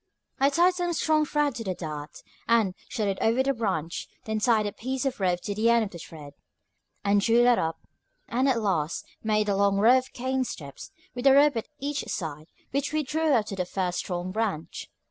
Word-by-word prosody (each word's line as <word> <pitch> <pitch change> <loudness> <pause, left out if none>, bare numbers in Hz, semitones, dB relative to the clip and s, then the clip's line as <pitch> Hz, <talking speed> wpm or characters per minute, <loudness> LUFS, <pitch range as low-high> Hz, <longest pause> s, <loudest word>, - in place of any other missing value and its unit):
I 275 +1 +5
tied 345 +5 +4
some 350 -1 -1
strong 310 -1 +2
thread 295 -1 +1
to 235 -1 -5
the 190 -3 -3
dart, 150 -3 -7 0.2
and 225 -5 +3 0.2
shot 225 -5 -1
it 195 -1 -1
over 230 +4 +3
the 275 +1 +1
branch; 170 - -2 0.2
then 220 0 -1
tied 220 -1 +3
a 205 - -2
piece 260 +6 -3
of 265 -4 -2
rope 180 -2 +1
to 205 - -3
the 220 +3 +2
end 235 -1 +4
of 205 - -5
the 170 - -9
thread, 150 -3 -10 0.7
and 200 0 +4
drew 230 +3 +4
that 245 -1 +5
up, 160 0 -3 0.4
and 260 +3 +1
at 245 -3 +2
last 170 -7 -1 0.2
made 215 -1 +1
a 200 - +1
long 200 0 +2
row 235 +6 +6
of 260 - -11
cane 260 +1 -1
steps, 140 - -8 0.2
with 245 +2 0
a 270 - +8
rope 285 -1 +5
at 225 - -3
each 285 0 -3
side, 155 -4 -5 0.2
which 280 +2 -1
we 310 0 0
drew 315 +3 0
up 230 -6 +3
to 200 - -5
the 185 - -1
first 180 0 -2
strong 180 0 -3
branch. 200 -6 -3
225 Hz, 220 wpm, -27 LUFS, 185-265 Hz, 0.7 s, a